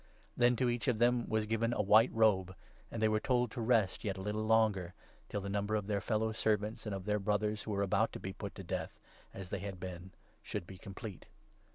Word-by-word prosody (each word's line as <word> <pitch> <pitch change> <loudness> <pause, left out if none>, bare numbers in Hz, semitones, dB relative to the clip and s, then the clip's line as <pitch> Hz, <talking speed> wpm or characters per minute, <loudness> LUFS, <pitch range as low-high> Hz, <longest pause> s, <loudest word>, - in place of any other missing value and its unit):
' - - -30
Then 125 0 +4
to 125 +1 +1
each 120 +2 -1
II 125 - +4
of - - -6
them 120 +1 +2
was 110 -1 +1
given 115 +2 0
a - - +1
white 110 +4 +6
robe, 95 -5 +3 0.3
and 115 - -5
they 110 - +4
were 110 0 +2
told 125 0 +1
to 120 - -4
rest 110 -5 +2
yet 100 -2 -2
a - - -5
little 105 +2 -2
longer, 105 -6 +2 0.3
till 105 - -2
the 100 - -5
number 100 +2 -1
of 105 -2 -1
their 100 -1 -1
fellow 110 +1 0
servants 110 0 -1
and 100 - -2
of 95 -1 -6
their 105 0 +1
Brothers 105 +1 0
who - - -8
were 100 -1 +1
about 95 - +2
to - - -6
be 95 - -5
put 100 0 -7
to 95 - -7
death, 90 -2 -4 0.3
as 95 -1 -8
they - - -2
had 95 -1 -6
been, 90 0 -7 0.3
should - - -5
be 95 0 -11
complete. 100 +1 -8
105 Hz, 245 wpm, -34 LUFS, 95-110 Hz, 0.3 s, white